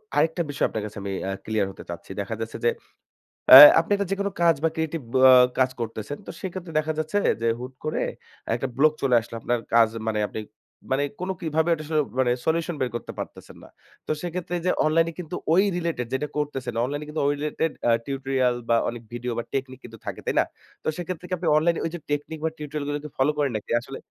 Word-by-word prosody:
আরেকটা 165 +2 +2
বিষয় 145 - 0
আপনার 110 - -4
কাছে 105 - -9
আমি 100 - -3 0.2
আ - - -1
ক্লিয়ার 110 -3 0
হতে - - -11
চাচ্ছি। 85 +2 -8
দেখা 105 +3 -4
যাচ্ছে 115 - -5
যে, - - +6 0.8
অ্যা 130 - +13 0.2
আপনি 165 - -3
একটা 200 -1 -2
যেকোনো 200 0 -1
কাজ 170 -1 +5
বা 165 - +4
ক্রিয়েটিভ 160 0 -2
ব - - -3 0.4
কাজ 130 0 +4
করতেছেন, 115 +4 -5
তো - - -5
সেক্ষেত্রে 185 -2 -6
দেখা 155 +1 -1
যাচ্ছে 155 +6 -1 0.2
যে, 115 - +1
হুট 125 +2 -7
করে 155 - -2 0.6
একটা 120 +3 -2
ব্লক 155 +2 +5
চলে 130 -3 +3
আসলো। 115 +1 -10
আপনার 120 +2 0 0.2
কাজ 115 -1 +7 0.2
মানে, 110 -1 0
আপনি 110 - -5 0.5
মানে 135 +2 +2 0.2
কোন 180 +1 -4
কিভাবে 160 0 0
ওটা 155 -2 -4
আসলে, 155 0 +1 0.2
মানে 125 -2 +3
সলিউশন 165 +1 0
বের 130 - +1
করতে 120 - -5
পারতেছেন - - -8
না। - - -14 0.4
তো - - -1
সেক্ষেত্রে 175 0 -4
এই 170 - -7
যে - - +4
অনলাইনে 165 +2 +3
কিন্তু 175 0 -5 0.2
ওই 185 +3 +5
রিলেটেড 165 -8 -2
যেটা 130 +3 -1
করতেছেন, 135 -4 -3
অনলাইন 145 +4 -2
এ - - -9
কিন্তু 150 - -2
ওই 145 - +3
রিলেটেড 150 +2 -1 0.2
আ - - +5
টিউটোরিয়াল 135 -2 0
বা 115 - +5
অনেক 120 0 -7
ভিডিও 125 +1 -3
বা 120 - -1
টেকনিক 130 -1 -3
কিন্তু 115 -1 -11
থাকে, - - -5
তাই - - -1
না? - - +5 0.4
তো - - -6
সেক্ষেত্রে 180 0 -5
কি - - -3
আপনি 175 - -3
অনলাইনে 165 +2 +2
ওই 165 - -2
যে - - -6
টেকনিক 145 +2 -3
বা - - +2
টিউটোরিয়াল 150 -1 -5
গুলোকে 145 +1 -4
ফলো 135 +3 +3
করেন 145 -3 +1
নাকি 105 - -9
আসলে? 135 +3 -9
145 Hz, 220 wpm, -25 LUFS, 125-165 Hz, 0.8 s, অ্যা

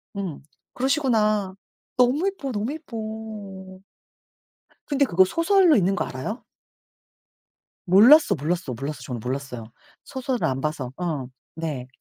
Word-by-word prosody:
음 190 -7 -4 0.3
그러시구나. 220 -8 +1 0.4
너무 255 +9 +3
이뻐, 335 -9 -3
너무 220 +3 -2
이뻐. 310 -7 -8 1.9
근데 280 -1 +2
그거 190 -5 +4
소설로 335 - +4
있는 195 -1 +2
거 - - -1
알아요? 170 - -5 1.4
몰랐어, 210 - +7
몰랐어, 160 -1 -2
몰랐어 135 +4 -5
저는 125 -1 -5
몰랐어요. 125 -3 -4 0.4
소설을 260 -2 -2
안 130 0 -2
봐서. 145 -4 -3
어 155 -8 -3 0.3
네. 150 -6 -4
195 Hz, 250 characters per minute, -24 LUFS, -, 1.9 s, 몰랐어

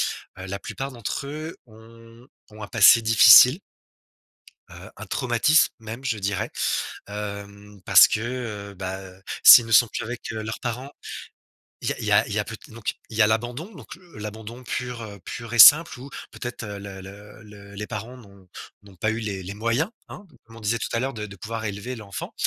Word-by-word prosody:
heu, 95 - -13
la 100 +1 -5
plupart 135 +6 -6
d'entre 120 +3 -5
eux 155 +3 -7
ont 115 +1 -17 0.2
ont 105 0 -10
un - - -7
passé 115 +1 +6
difficile 115 - +7 1.1
heu - - -12
un - - -9
traumatisme, 125 +6 +2
même, 115 +3 -9
je 125 -5 -2
dirais, 100 -1 -3 0.6
hem, 100 0 -8
parce - - +8
que, 110 - -2
heu, 110 -4 -6
bah, 95 0 -6 0.4
s'ils 120 - +10
ne 115 - -6
sont 120 +1 +6
plus - - -5
avec, 120 +2 -7
heu, 110 -1 -5
leurs 110 0 -6
parents 125 +3 -5 0.9
il - - -2
y - - 0
a - - -12
il - - -6
y - - -1
a - - +4
il - - -6
y - - 0
a - - 0
peut - - -8
donc 115 -1 -5
il 110 - -8
y - - +4
a 105 - +6
l'abandon, 120 - -3
donc 140 +3 -12
heu, 180 -8 -18
l'abandon 110 +3 -9
pur, 125 -2 -5
heu, 100 -2 -10
pur 115 0 -7
et 120 - -2
simple 150 +3 +8
où 135 +3 -10 0.2
peut-être, 120 0 -7
heu, 105 -2 -7
le 100 -1 -9
le 105 +3 -13
le 100 -1 -14
les 105 +1 -5
parents 115 +3 -7
n'ont 100 -5 -18 0.3
n'ont 100 -2 -18
pas 110 +5 -1
eu 110 - -4
les 100 -4 -5
les 95 +2 -7
moyens, 115 - -1 0.2
hein, 205 - -11 0.2
comme 115 0 -17
on - - -11
disait 110 +2 -1
tout - - -4
à 115 - 0
l'heure, 135 +3 -3
de 105 -1 -6
de 100 - -12
pouvoir 110 +4 -6
élever 105 +5 -5
l'enfant. 105 -4 -8
110 Hz, 210 wpm, -23 LUFS, 105-120 Hz, 1.1 s, s'ils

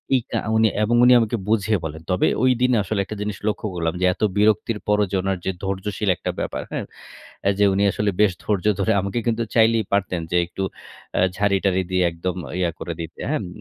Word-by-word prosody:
এইকা 125 - -1 0.2
উনি 110 0 +5 0.2
এবং 120 +3 +2
উনি 125 0 +7
আমাকে 115 +1 0
বুঝিয়ে 110 -1 +2
বলেন। 80 +1 -6
তবে 90 - +2 0.2
ঐদিন 125 0 +3
আসলে 105 +1 -2
একটা 105 - -6
জিনিস 105 -2 -3
লক্ষ্য 105 0 -1
করলাম 80 -1 -1
যে, - - +3
এত - - -19 0.2
বিরক্তির 105 +1 +2
পরও 105 0 +3
যে - - -1
ওনার 95 -1 -1
যে 95 - +1
ধৈর্যশীল 100 +1 -2
একটা - - -3
ব্যাপার। - - -3
হ্যাঁ? - - -3 0.6
অ্যা 100 - +3
যে 105 - +5
উনি 100 +1 +1
আসলে 105 -1 0
বেশ 105 -3 +5
ধৈর্য 105 -3 -1
ধরে, 105 +3 +2
আমাকে 100 +5 -2
কিন্তু 115 0 +1
চাইলেই 115 -2 +4
পারতেন 95 -3 0
যে 90 - +3
একটু 95 +2 -5 0.5
অ্যা - - +3
ঝাড়ি-টাড়ি 100 -2 +2
দিয়ে 90 0 +2
একদম 85 +2 -4 0.2
ইয়া 85 -2 +1
করে 85 - -4
দিতে। 80 +1 -8
হ্যাঁ? 155 -5 0
ম - - -6
100 Hz, 205 wpm, -22 LUFS, 95-110 Hz, 0.6 s, উনি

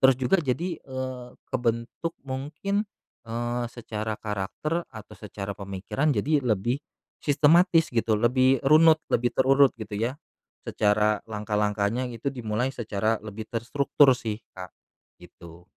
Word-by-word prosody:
Terus 130 -1 +6
juga 130 +9 +2
jadi, 165 +5 -2
eee, 130 -2 -6 0.2
kebentuk 120 +6 -2
mungkin, 150 +10 -3 0.4
eee, 120 +1 -2
secara 110 -2 -4
karakter 110 - -3
atau 110 -4 -11
secara 100 -1 -6
pemikiran 100 +9 -2
jadi 145 +8 +2
lebih, 120 +4 0 0.4
sistematis 165 +4 +4
gitu, 115 -2 +1
lebih 130 +3 +3
runut, 160 +2 +7
lebih 120 +1 +2
terurut 135 +1 +5
gitu 110 -1 -7
ya. 120 +6 -2 0.5
Secara 105 0 +2
langkah-langkahnya 105 +2 -1
gitu 115 +5 -3
dimulai 120 +1 -1
secara 110 -2 -1
lebih 110 0 -7
terstruktur 135 +4 +3
sih, 110 -3 -4 0.2
Kak. 90 -1 -9 0.5
Gitu. 85 0 -14
120 Hz, 120 wpm, -26 LUFS, 105-135 Hz, 0.5 s, runut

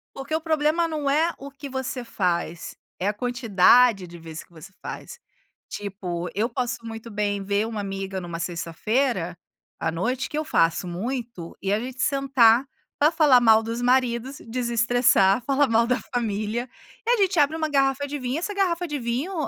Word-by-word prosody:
Porque 270 +3 -6
o 315 - +2
problema 315 +1 +1
não 300 -3 -2
é 320 +4 +2
o 280 +1 -9
que 280 +1 -9
você 265 -1 -4
faz, 175 -5 -2 0.2
é 190 - 0
a - - -1
quantidade 230 -2 +4
de 170 0 -11
vezes 160 -1 -9
que - - -35
você 165 +4 -12
faz. 480 - -8 0.5
Tipo, 180 -4 -5
eu 215 +4 0
posso 245 -1 -3
muito 225 0 -8
bem, 205 -1 -1
ver 200 +2 0
uma 220 -2 -4
amiga 195 -1 -4
numa 170 -1 -6
sexta-feira 175 +3 -1 0.4
à 160 - -1
noite, 245 +11 -2
que 300 - -4
eu 310 - -1
faço 165 - +1
muito, 225 -1 -5
e 195 +1 0
a 210 - +1
gente 255 +1 -6
sentar 265 -3 +4 0.3
para 300 +2 +4
falar 295 -6 +5
mal 220 -2 +6
dos 230 +2 -4
maridos, 250 +1 +1
desestressar, 235 -3 +3
falar 275 0 +3
mal 230 0 +3
da 250 +2 +1
família, 225 +1 -2 0.4
e 465 - -2
a - - +4
gente 385 -3 +2
abre 300 +2 +3
uma 315 -1 0
garrafa 275 0 +1
de 290 +1 -4
vinho. 255 +2 -2
Essa 385 +5 -3
garrafa 355 -3 0
de 295 - -3
vinho 250 +9 -2
240 Hz, 180 wpm, -24 LUFS, 200-275 Hz, 0.5 s, mal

